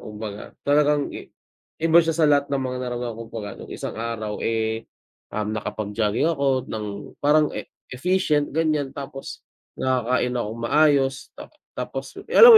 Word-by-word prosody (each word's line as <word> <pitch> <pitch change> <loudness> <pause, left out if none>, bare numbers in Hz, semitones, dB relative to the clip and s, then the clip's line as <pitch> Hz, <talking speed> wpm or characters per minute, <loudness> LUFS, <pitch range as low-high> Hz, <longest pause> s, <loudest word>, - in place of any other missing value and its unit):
kumbaga. 105 -1 -7
Talagang 145 0 +3
i - - -8 0.6
iba 165 +1 +7
siya 165 -1 0
sa 165 - +4
lahat 145 -1 +4
ng 140 -1 0
mga 125 0 -2
narana 120 -1 -3
kumbaga 110 -2 -7
no'ng - - -9
isang - - -4
araw, 110 -2 -4
eh, 110 0 -1 0.5
um, 105 0 -1
nakapag-jogging 110 +6 0
ako 135 -3 +1
ng 105 -2 -5
parang 150 +1 +4
e - - -5 0.2
efficient 150 0 +2
ganiyan, 155 -3 +2
tapos 135 -1 -7 0.3
nakakain 125 -1 +1
akong 115 -2 -3
maayos. 140 0 +3
Ta - - -10 0.3
tapos - - -4
'yung - - -10
alam 475 - +11
130 Hz, 150 wpm, -24 LUFS, 110-145 Hz, 0.6 s, alam